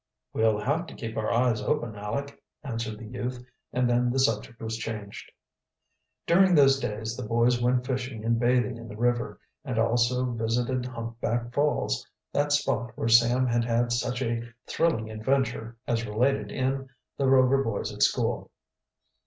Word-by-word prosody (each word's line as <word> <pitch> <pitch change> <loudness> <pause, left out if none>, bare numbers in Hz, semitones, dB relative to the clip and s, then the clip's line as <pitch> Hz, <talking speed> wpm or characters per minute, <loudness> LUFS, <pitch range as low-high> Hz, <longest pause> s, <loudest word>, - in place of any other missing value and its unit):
"We'll 110 -1 +3
have 145 +10 -1
to - - -10
keep 115 -2 -6
our 110 - -1
eyes 115 -2 +2
open, 120 -1 -1
Aleck," 115 +8 -5 0.2
answered 115 -5 -4
the 115 - -9
youth; 125 +2 -5 0.3
and 125 0 +1
then 120 0 +2
the 125 - -1
subject 115 -3 0
was 110 0 -4
changed. 105 -3 -6 0.9
During 185 +1 +5
those 135 -2 +6
days 110 -2 -3
the - - -6
boys 120 +1 +2
went 125 +1 +2
fishing 125 -4 -3
and 115 0 +2
bathing 125 0 +2
in 115 0 -9
the 105 0 -9
river, 120 -2 0 0.2
and 130 -5 -4
also 120 +2 +2
visited 120 +2 -1
Humpback 120 0 -3
Falls, 145 - +1 0.3
that 145 0 +1
spot 135 -5 0
where 115 - -1
Sam 120 +2 +5
had 120 -1 +1
had 120 0 +1
such 120 +1 -1
a 115 -1 -1 0.2
thrilling 115 -10 0
adventure, 115 0 -1
as 115 -1 -1
related 105 -1 +1
in 135 +1 -1 0.3
"The 135 - +2
Rover 135 +1 +5
Boys 115 -4 -3
at - - -8
School." - - +1
120 Hz, 160 wpm, -27 LUFS, 115-130 Hz, 0.9 s, those